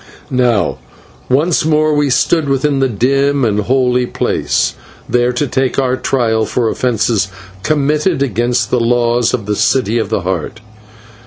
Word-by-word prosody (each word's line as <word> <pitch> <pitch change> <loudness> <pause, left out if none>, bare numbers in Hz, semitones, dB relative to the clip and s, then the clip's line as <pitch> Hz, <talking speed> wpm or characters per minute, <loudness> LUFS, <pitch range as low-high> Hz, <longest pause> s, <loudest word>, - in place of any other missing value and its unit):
Now 125 -5 +1 0.5
once 150 +6 +2
more 155 0 +2
we 145 -1 +1
stood 140 +4 +1
within 135 +1 +1
the 135 -1 +1
dim 135 +4 +1
and 105 -2 0
holy 125 +2 +1
place, - - -1 0.3
there 125 0 +1
to 125 +4 -1
take 130 -1 -1
our 130 -2 +1
trial 115 -4 0
for 120 -3 0
offences 110 -5 0 0.3
committed 150 - 0
against 120 -2 -1
the 125 - +2
laws 120 0 +1
of 115 -5 -3
the 105 0 -1
City 120 0 +1
of 110 - -2
the 110 - -1
Heart. 90 +3 -4
125 Hz, 150 wpm, -15 LUFS, 115-140 Hz, 0.5 s, once